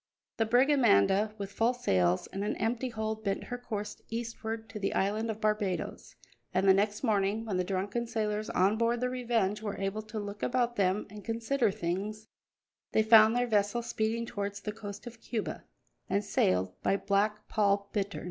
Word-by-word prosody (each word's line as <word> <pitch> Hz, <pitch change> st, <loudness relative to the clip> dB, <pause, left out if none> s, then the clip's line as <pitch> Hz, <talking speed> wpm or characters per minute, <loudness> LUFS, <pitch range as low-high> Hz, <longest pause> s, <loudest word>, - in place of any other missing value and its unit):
The 225 Hz, -, +1 dB
brig 250 Hz, +5 st, +4 dB
Amanda, 210 Hz, -, +4 dB
with 200 Hz, -1 st, -5 dB
full 230 Hz, +4 st, +1 dB
sails 90 Hz, -, +2 dB
and 195 Hz, -, -2 dB
an 210 Hz, -, -1 dB
empty 235 Hz, +4 st, -1 dB
hold, 220 Hz, -1 st, -3 dB
bent 195 Hz, -1 st, -1 dB
her 245 Hz, -, -5 dB
course 210 Hz, -4 st, -5 dB
eastward 225 Hz, -1 st, -4 dB
to 210 Hz, +1 st, -6 dB
the 195 Hz, -, -1 dB
island 215 Hz, +4 st, 0 dB
of 220 Hz, -1 st, -3 dB
Barbadoes, 210 Hz, -4 st, -2 dB, 0.4 s
and 190 Hz, +2 st, +3 dB
the 190 Hz, -, +8 dB
next 205 Hz, +3 st, 0 dB
morning, 210 Hz, -1 st, +1 dB
when 200 Hz, -5 st, -1 dB
the 180 Hz, -, +1 dB
drunken 195 Hz, +5 st, -2 dB
sailors 215 Hz, -1 st, -2 dB
on 195 Hz, +4 st, +2 dB
board 235 Hz, +1 st, +2 dB
the 250 Hz, +1 st, -1 dB
Revenge 230 Hz, -5 st, 0 dB
were 210 Hz, -2 st, -4 dB
able 195 Hz, +2 st, -2 dB
to 215 Hz, +1 st, -8 dB
look 205 Hz, -1 st, -5 dB
about 240 Hz, -1 st, +1 dB
them 195 Hz, -1 st, +1 dB
and 210 Hz, -1 st, -9 dB
consider 230 Hz, +1 st, 0 dB
things, 200 Hz, +4 st, -3 dB, 0.7 s
they 220 Hz, -, +4 dB
found 220 Hz, 0 st, +7 dB
their 245 Hz, 0 st, +2 dB
vessel 215 Hz, +1 st, +1 dB
speeding 230 Hz, 0 st, -1 dB
towards 200 Hz, -2 st, -4 dB
the 210 Hz, -, -3 dB
coast 205 Hz, 0 st, -8 dB
of 235 Hz, -1 st, -10 dB
Cuba, 220 Hz, -4 st, -4 dB, 0.4 s
and 200 Hz, +2 st, +1 dB
sailed 90 Hz, -, +1 dB
by 195 Hz, -, +2 dB
Black 205 Hz, +2 st, 0 dB
Paul 200 Hz, -2 st, +1 dB
Bittern. 200 Hz, -1 st, -2 dB
215 Hz, 185 wpm, -30 LUFS, 200-225 Hz, 0.7 s, the